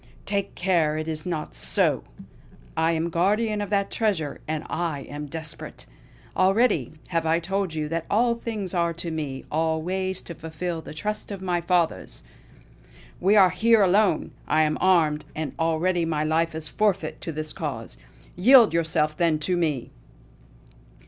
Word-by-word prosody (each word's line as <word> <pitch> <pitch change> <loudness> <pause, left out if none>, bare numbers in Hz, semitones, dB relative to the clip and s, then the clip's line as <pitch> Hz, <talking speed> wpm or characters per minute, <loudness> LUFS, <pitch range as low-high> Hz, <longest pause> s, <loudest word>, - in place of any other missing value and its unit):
Take 200 -1 -2
care 170 -5 +1
it 155 0 -3
is 155 +1 -3
not 160 -4 -3
so! - - +1 0.7
I 160 +1 +2
am 165 +1 -1
guardian 210 +5 +1
of 205 - -4
that 200 -1 0
treasure; 185 -10 -1
and 155 0 -2
I 160 -4 -2
am 145 +2 -7
desperate! 160 +1 -7 0.5
Already 190 - +2 0.2
have 165 -2 0
I 165 +1 +3
told 190 0 -2
you 155 -1 -2
that 165 0 -3
all 235 +3 +3
things 220 -5 -5
are 170 -1 +1
to 170 0 -5
me, 145 -4 -4
all 160 +1 +1
ways 185 +1 -1
to 170 - -8
fulfill 165 +1 -5
the 155 - -10
trust 210 +6 -4
of 195 -2 -6
my 175 -2 0
fathers. 170 - 0 1.0
We 195 +4 +3
are 190 -3 +7
here 220 +3 +4
alone! 195 -2 +2 0.2
I 155 - +3
am 155 0 0
armed; 160 -5 +3
and 155 -3 -3
already 165 +2 +1
my 155 -2 0
life 160 +1 +1
is 160 -1 -6
forfeit 205 0 0
to 165 - -4
this 155 0 -5
course. - - -5 0.4
Yield 230 +2 +7
yourself, 155 -2 +1
then, 165 -2 +2
to 165 +4 -1
me!" 155 -8 -1
170 Hz, 160 wpm, -25 LUFS, 155-190 Hz, 1.0 s, are